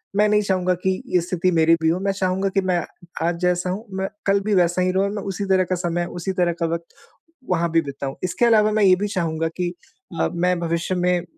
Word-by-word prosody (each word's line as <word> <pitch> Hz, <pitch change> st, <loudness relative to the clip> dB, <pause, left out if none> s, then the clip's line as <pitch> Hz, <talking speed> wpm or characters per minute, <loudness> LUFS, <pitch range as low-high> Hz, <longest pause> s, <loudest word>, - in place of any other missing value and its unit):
मैं 210 Hz, +1 st, +4 dB
नहीं 210 Hz, 0 st, +3 dB
चाहूँगा 185 Hz, -2 st, +1 dB
कि 190 Hz, 0 st, 0 dB
ये 180 Hz, -, +5 dB
स्थिति 180 Hz, +1 st, 0 dB
मेरी 165 Hz, -1 st, +4 dB
भी 160 Hz, -, +3 dB
हो 175 Hz, +3 st, +1 dB
मैं 195 Hz, 0 st, 0 dB
चाहूँगा 190 Hz, 0 st, 0 dB
कि 195 Hz, 0 st, +1 dB
मैं 185 Hz, -2 st, +1 dB, 0.5 s
आज 170 Hz, 0 st, 0 dB
जैसा 180 Hz, 0 st, +1 dB
हूँ, 200 Hz, +5 st, -4 dB
मैं 190 Hz, 0 st, -2 dB, 0.2 s
कल 200 Hz, 0 st, +3 dB
भी 215 Hz, -, +1 dB
वैसा 175 Hz, 0 st, +2 dB
ही 185 Hz, -, +2 dB
रहूँ 190 Hz, +2 st, +1 dB
और 200 Hz, -, -2 dB
मैं 205 Hz, -, -4 dB
उसी 195 Hz, 0 st, -3 dB
तरह 190 Hz, -1 st, +3 dB
का 185 Hz, 0 st, -1 dB
समय, 175 Hz, -1 st, -1 dB
उसी 175 Hz, +2 st, -4 dB
तरह 175 Hz, -2 st, +1 dB
का 170 Hz, -, +1 dB
वक़्त 170 Hz, 0 st, -6 dB, 0.6 s
वहाँ 170 Hz, -1 st, +1 dB
भी 165 Hz, 0 st, +3 dB
बिताऊँ। 140 Hz, -1 st, -5 dB
इसके 185 Hz, +6 st, +1 dB
अलावा 215 Hz, -2 st, +4 dB
मैं 215 Hz, 0 st, +2 dB
ये 185 Hz, -2 st, +6 dB
भी 205 Hz, -, +1 dB
चाहूँगा 165 Hz, -5 st, -1 dB
कि 180 Hz, -1 st, -1 dB, 0.5 s
अ, -, -, +3 dB
मैं 180 Hz, +1 st, +1 dB
भविष्य 170 Hz, +2 st, -1 dB
में 180 Hz, -1 st, +1 dB
180 Hz, 245 wpm, -22 LUFS, 170-195 Hz, 0.6 s, ये